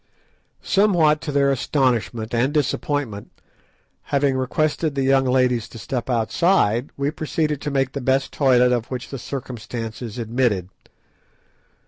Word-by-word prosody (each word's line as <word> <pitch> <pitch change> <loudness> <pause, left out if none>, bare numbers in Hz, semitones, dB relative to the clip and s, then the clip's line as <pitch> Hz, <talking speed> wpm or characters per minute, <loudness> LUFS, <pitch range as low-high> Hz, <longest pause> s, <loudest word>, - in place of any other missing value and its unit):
Somewhat 175 -7 +3
to 150 - -4
their 140 -1 +3
astonishment 120 -4 0
and 120 +4 +2
disappointment, 145 -6 -1 0.8
having 140 -1 +1
requested 150 +3 0
the 135 - 0
young 135 0 +3
ladies 125 -3 +2
to - - -11
step 120 +3 -4
outside, 120 - +2
we 140 +1 0
proceeded 155 -2 -2
to 150 - -3
make 135 -2 0
the 140 - -5
best 135 +2 0
toilet 125 -3 +4
of 120 -2 -1
which 125 -1 -5
the 135 - -5
circumstances 115 -3 -6
admitted. 115 -5 0
130 Hz, 130 wpm, -22 LUFS, 120-145 Hz, 0.8 s, toilet